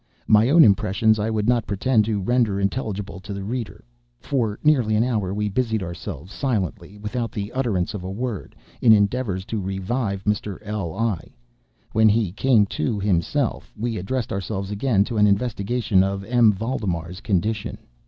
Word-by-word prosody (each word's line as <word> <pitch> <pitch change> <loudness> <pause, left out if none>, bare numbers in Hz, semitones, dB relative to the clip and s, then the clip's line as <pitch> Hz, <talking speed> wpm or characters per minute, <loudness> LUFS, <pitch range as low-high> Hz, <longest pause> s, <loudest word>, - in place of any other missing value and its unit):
My 110 +3 +5
own 165 +3 +7
impressions 110 0 +3
I 105 +2 0
would 110 -1 -1
not 120 -2 +2
pretend 110 +2 +2
to 105 -2 -1
render 110 -1 +1
intelligible 100 -3 -3
to 100 +2 -7
the 100 - -5
reader. 115 +2 -5 0.4
For 115 - -1
nearly 130 -8 +3
an 110 - +3
hour, 110 -7 -1
we 105 +1 -1
busied 110 -1 -1
ourselves, 85 0 -7
silently—without 105 -1 -3
the 105 +1 -4
utterance 115 -10 -1
of 100 -4 -5
a 90 - -5
word—in 115 +1 -2
endeavors 100 -2 +1
to 110 -2 -3
revive 95 +2 -2
Mr. 105 -2 -1
L—l. 105 -1 -2 0.7
When 110 0 +5
he 105 -3 +1
came 110 +1 +3
to 110 -5 0
himself, 105 - 0
we 115 +1 -2
addressed 115 +6 -3
ourselves 100 0 -3
again 105 -1 +2
to 115 +1 -4
an 105 0 +5
investigation 100 -1 +1
of 100 0 -2
M. 115 0 +4
Valdemar's 95 -6 -3
condition. 105 +2 -1
105 Hz, 155 wpm, -23 LUFS, 100-115 Hz, 0.7 s, own